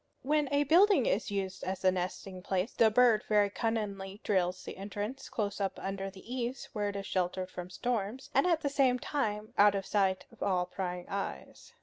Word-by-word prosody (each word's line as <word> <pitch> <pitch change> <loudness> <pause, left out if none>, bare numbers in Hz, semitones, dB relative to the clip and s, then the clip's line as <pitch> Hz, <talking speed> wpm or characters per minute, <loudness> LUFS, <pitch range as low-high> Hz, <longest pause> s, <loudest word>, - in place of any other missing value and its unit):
When 295 +1 +2
a 285 0 +3
building 370 +8 +5
is - - 0
used 190 -2 -3
as 190 +1 -3
a 185 - +6
nesting 185 +1 -4
place, 190 +3 -1
the 225 - +5
bird 230 -1 +4
very 205 -2 +4
cunningly 205 -3 -2
drills 185 -2 0
the - - -7
entrance 205 +6 -5
close 205 -2 -2
up 195 -1 -1
under 195 0 -3
the 190 0 -14
eaves, 250 +1 -4
where 205 -2 -1
it 200 - -6
is 200 -1 -4
sheltered 185 0 -1
from 180 0 -7
storms, 235 +4 -3
and 275 +7 +4
at 335 -3 +2
the 290 - -1
same 270 -3 +3
time 220 -5 -2
out 205 0 +7
of 195 -1 -2
sight 190 -2 +1
of - - -19
all 180 -2 +1
prying 180 -1 -4
eyes. 130 - -6
205 Hz, 200 wpm, -31 LUFS, 190-245 Hz, -, out